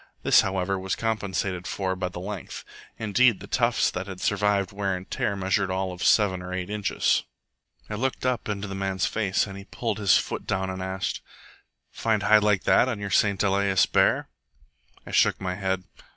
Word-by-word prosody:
This, -, -, +6 dB
however, 95 Hz, 0 st, -1 dB
was 95 Hz, 0 st, -2 dB
compensated 100 Hz, -5 st, -2 dB
for 95 Hz, -1 st, -2 dB
by 90 Hz, -1 st, -3 dB
the 90 Hz, -, -8 dB
length. 100 Hz, 0 st, -7 dB, 0.3 s
Indeed, 110 Hz, 0 st, +3 dB
the 100 Hz, -, -9 dB
tufts 120 Hz, +1 st, +1 dB
that 95 Hz, +2 st, -5 dB
had 95 Hz, -2 st, -7 dB
survived 100 Hz, 0 st, +1 dB
wear 100 Hz, -2 st, -1 dB
and 90 Hz, -, -10 dB
tear 100 Hz, -, -1 dB
measured 95 Hz, 0 st, 0 dB
all 95 Hz, 0 st, -1 dB
of 90 Hz, -, -6 dB
seven 95 Hz, -4 st, +3 dB
or 90 Hz, 0 st, -7 dB
eight 90 Hz, +1 st, -4 dB
inches. 105 Hz, -1 st, +1 dB, 0.7 s
I -, -, -6 dB
looked 130 Hz, +4 st, -2 dB
up 125 Hz, -3 st, -1 dB
into 105 Hz, 0 st, -3 dB
the 95 Hz, -, -6 dB
man's 95 Hz, -1 st, -1 dB
face, 100 Hz, -3 st, 0 dB
and 100 Hz, -2 st, -9 dB
he 100 Hz, -, -11 dB
pulled 110 Hz, -1 st, -3 dB
his 100 Hz, -3 st, +5 dB
foot -, -, -4 dB
down 95 Hz, 0 st, -1 dB
and 95 Hz, 0 st, -6 dB
asked, 95 Hz, 0 st, -3 dB, 0.7 s
"Find 110 Hz, -3 st, 0 dB
hide 110 Hz, 0 st, +6 dB
like 105 Hz, -2 st, +2 dB
that 130 Hz, -, +4 dB
on 120 Hz, -, -2 dB
your 100 Hz, -1 st, -5 dB
St 100 Hz, +2 st, +2 dB
Elias 100 Hz, -1 st, +3 dB
bear?" -, -, +2 dB, 0.8 s
I -, -, -9 dB
shook -, -, +3 dB
my 90 Hz, -1 st, -2 dB
head. 95 Hz, -1 st, -2 dB
100 Hz, 195 wpm, -26 LUFS, 95-105 Hz, 0.8 s, This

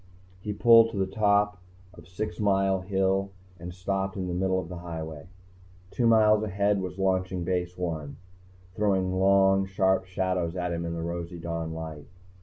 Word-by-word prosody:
He 105 Hz, -, -4 dB
pulled 115 Hz, +2 st, +6 dB
to 115 Hz, -, -7 dB
the 95 Hz, -, +1 dB
top 105 Hz, 0 st, +1 dB, 0.3 s
of -, -, -15 dB
Six 90 Hz, -1 st, -5 dB
Mile 95 Hz, -2 st, +2 dB
Hill 95 Hz, +1 st, 0 dB, 0.3 s
and 90 Hz, +1 st, -7 dB
stopped 95 Hz, +2 st, -3 dB
in 95 Hz, -1 st, -3 dB
the 90 Hz, -, -3 dB
middle 95 Hz, +1 st, 0 dB
of 90 Hz, -, -6 dB
the 90 Hz, 0 st, -7 dB
highway. 80 Hz, -3 st, -7 dB, 0.6 s
Two 120 Hz, -, +1 dB
miles 110 Hz, -2 st, +5 dB
ahead 100 Hz, -1 st, 0 dB
was 90 Hz, 0 st, -6 dB
Launching 95 Hz, -1 st, 0 dB
Base 90 Hz, 0 st, -2 dB
I, 80 Hz, -4 st, -3 dB, 0.7 s
throwing 95 Hz, -2 st, +1 dB
long, 95 Hz, 0 st, +4 dB
sharp 95 Hz, 0 st, +1 dB
shadows 90 Hz, -2 st, -1 dB
at 90 Hz, -1 st, -2 dB
him 85 Hz, 0 st, -3 dB
in 85 Hz, 0 st, -3 dB
the 85 Hz, -, -4 dB
rosy 85 Hz, +1 st, -5 dB
dawn 85 Hz, -1 st, -4 dB
light. 80 Hz, -2 st, -7 dB
95 Hz, 170 wpm, -27 LUFS, 85-100 Hz, 0.7 s, pulled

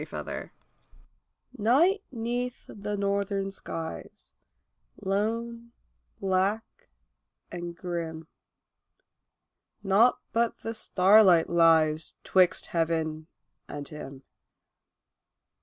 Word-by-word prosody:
THE -, -, -6 dB
CAMPER -, -, -6 dB, 1.1 s
Night 315 Hz, -, +3 dB
'neath 245 Hz, +1 st, -3 dB
the 205 Hz, 0 st, -5 dB
northern 200 Hz, 0 st, -1 dB
skies, 165 Hz, -4 st, -8 dB, 0.7 s
lone, 230 Hz, +4 st, -2 dB, 0.5 s
black, 195 Hz, +3 st, +1 dB, 0.9 s
and 175 Hz, -1 st, -6 dB
grim: 165 Hz, -3 st, -5 dB, 1.6 s
Naught 210 Hz, +5 st, +4 dB, 0.2 s
but 230 Hz, 0 st, +1 dB
the 225 Hz, -, -4 dB
starlight 190 Hz, -4 st, +5 dB
lies 160 Hz, -2 st, +3 dB
'twixt 185 Hz, -2 st, +3 dB
heaven, 160 Hz, -2 st, -1 dB, 0.4 s
and 145 Hz, -1 st, -7 dB
him. 140 Hz, -3 st, -9 dB
195 Hz, 75 wpm, -28 LUFS, 165-225 Hz, 1.6 s, starlight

